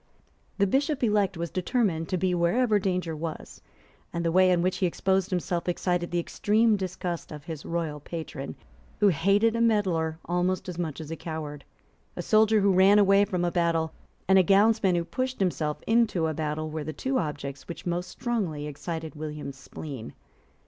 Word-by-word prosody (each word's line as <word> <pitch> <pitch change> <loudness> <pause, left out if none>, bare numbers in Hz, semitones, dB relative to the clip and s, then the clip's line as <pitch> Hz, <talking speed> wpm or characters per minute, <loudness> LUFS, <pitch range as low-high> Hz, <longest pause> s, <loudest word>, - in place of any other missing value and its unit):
The 200 - +4
Bishop 275 - 0
elect 210 -5 +2
was 170 -1 -4
determined 185 -4 0
to 185 - 0
be 180 +1 +1
wherever 210 +6 +2
danger 180 -4 -1
was; 160 0 -6 0.5
and 170 0 -3
the 165 - +2
way 185 +1 +5
in 175 -1 +3
which 185 0 0
he 185 - +2
exposed 190 +2 0
himself 180 -1 -1
excited 175 0 -1
the 175 - -1
extreme 215 +5 +2
disgust 180 -3 -4
of 150 -2 -8
his 160 -3 -7
royal 165 -3 -2
patron, 155 -2 -6 0.4
who 205 -2 +5
hated 200 +7 +3
a 230 - 0
meddler 185 -8 +1
almost 180 +2 0
as 180 -1 -5
much 160 -3 -3
as 155 0 -8
a - - -2
coward. 155 -3 -6 0.5
A - - -4
soldier 215 -1 +4
who 195 -1 +4
ran 190 +3 +6
away 200 0 +5
from 180 -4 -1
a 175 - 0
battle 165 -2 +1 0.3
and 190 0 +6
a - - +6
gownsman 200 0 +4
who 170 -1 0
pushed 255 +9 -3
himself 160 -5 -1
into 225 -7 +2
a 160 - 0
battle 155 0 -3
were 155 -1 -4
the 155 +1 -5
two 265 - -1
objects 145 -3 -5
which 170 -1 -8
most 175 +1 -2
strongly 185 -11 -2
excited 160 +2 -5
William's 150 -3 -6
spleen. 135 -4 -8
175 Hz, 185 wpm, -27 LUFS, 160-200 Hz, 0.5 s, ran